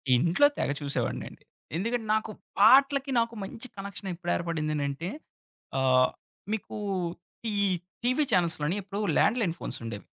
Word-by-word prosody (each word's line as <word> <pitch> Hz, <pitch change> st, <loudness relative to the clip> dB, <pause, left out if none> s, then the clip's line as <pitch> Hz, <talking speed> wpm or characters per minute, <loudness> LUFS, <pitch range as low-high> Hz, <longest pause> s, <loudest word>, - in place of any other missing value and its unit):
ఇంట్లో 170 Hz, -, +5 dB
తెగ -, -, 0 dB
చూసేవాడినండి. 140 Hz, -1 st, -3 dB, 0.3 s
ఎందుకంటే, 230 Hz, +3 st, -1 dB
నాకు 220 Hz, 0 st, -1 dB, 0.3 s
పాట్లకి 275 Hz, +4 st, +6 dB
నాకు 230 Hz, 0 st, 0 dB
మంచి 230 Hz, +6 st, -7 dB
కనెక్షనెప్పుడేర్పడిందనంటే 170 Hz, -5 st, -2 dB, 0.7 s
ఆహ్, 130 Hz, -1 st, +4 dB, 0.4 s
మీకు 220 Hz, 0 st, -3 dB, 0.8 s
ఈ -, -, -2 dB, 0.5 s
టీవీ 255 Hz, +5 st, +3 dB
చానెల్స్‌లోని 165 Hz, -2 st, +2 dB
ఇప్పుడు 200 Hz, +2 st, -5 dB, 0.2 s
ల్యాండ్‌లైన్ 220 Hz, -7 st, +3 dB
ఫోన్సుండేవి. 115 Hz, -5 st, -4 dB
190 Hz, 100 wpm, -28 LUFS, 155-230 Hz, 0.8 s, పాట్లకి